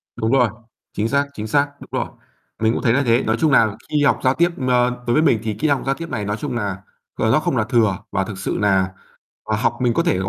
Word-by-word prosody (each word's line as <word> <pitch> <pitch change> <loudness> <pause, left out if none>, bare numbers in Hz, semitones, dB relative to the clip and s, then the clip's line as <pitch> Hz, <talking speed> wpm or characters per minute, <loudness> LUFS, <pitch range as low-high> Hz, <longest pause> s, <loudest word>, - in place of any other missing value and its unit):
Đúng 110 +1 -1
rồi, 125 -4 +4 0.4
chính 110 +2 -1
xác, 140 0 +1
chính 110 -2 -5
xác, 145 +5 +2
đúng - - -12
rồi, - - -4 0.5
mình 110 +1 +2
cũng - - -2
thấy 115 -3 +3
là 140 +2 +2
thế. 115 +2 +3
Nói 110 0 0
chung 155 -3 +3
là 110 -5 +4
khi 150 -1 +1
học - - +3
giao 130 +1 +4
tiếp, 170 +3 +2 0.2
ơ, 125 0 +1
đối 120 - +2
với 155 - +4
mình 130 -9 +3
thì 110 -1 -2
kỹ 155 - +1
năng 140 -2 +1
giao 135 0 +1
tiếp 165 0 -7
này 105 -5 -3
nói 105 +2 -2
chung 130 -2 -4
là, 100 -4 -2 0.4
ờ, - - +1
nó - - +4
không - - -1
là - - +2
thừa 110 -6 +2
và 95 -1 0
thực 95 -1 -7
sự - - -3
là 95 -2 +1 0.6
là 105 - +2
học 120 +1 0
mình 120 -2 +2
có 170 - +2
thể 130 - +1
gọi 95 0 -2
120 Hz, 280 wpm, -20 LUFS, 105-140 Hz, 0.6 s, rồi